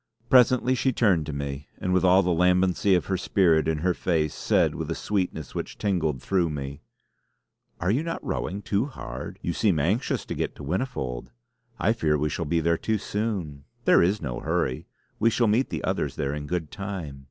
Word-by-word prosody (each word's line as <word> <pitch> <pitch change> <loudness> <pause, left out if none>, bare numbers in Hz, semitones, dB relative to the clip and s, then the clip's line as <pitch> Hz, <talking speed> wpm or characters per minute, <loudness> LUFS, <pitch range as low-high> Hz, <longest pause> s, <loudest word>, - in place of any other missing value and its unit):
Presently 125 0 +5
she 130 +1 +1
turned 95 - +2
to - - -3
me, 70 0 -5
and 90 - -1
with 95 - +3
all 95 +1 +5
the 90 - +1
lambency 90 +2 +3
of - - -3
her 95 - -1
spirit 85 -5 +3
in 80 -1 +1
her 90 - +3
face, 80 -4 0
said - - +2
with - - -5
a - - -1
sweetness 90 -7 -2
which - - -5
tingled 80 - -1
through 90 -4 +1
me: 70 -1 -5 1.0
"Are 90 +3 +1
you 125 +7 +2
not 165 0 -4
rowing 100 +2 -3
too 105 +6 0
hard? 65 - -7
You 85 - -1
seem 95 -2 +2
anxious 95 - 0
to - - -4
get - - -3
to - - -10
Whinnyfold. 70 - -3 0.5
I 110 +6 +2
fear 75 -8 +1
we 75 +1 0
shall 85 - -3
be 80 +3 +1
there 85 +1 +1
too 110 -1 0
soon. 95 -10 -3 0.2
There - - +6
is 95 +2 +1
no 65 -4 -3
hurry; 80 -5 -1 0.3
we 115 - +4
shall 115 +2 +2
meet 115 +5 +2
the - - -4
others - - -1
there 70 0 -2
in 75 0 -5
good 85 -3 -3
time. 95 -9 -6
90 Hz, 200 wpm, -26 LUFS, 75-105 Hz, 1.0 s, There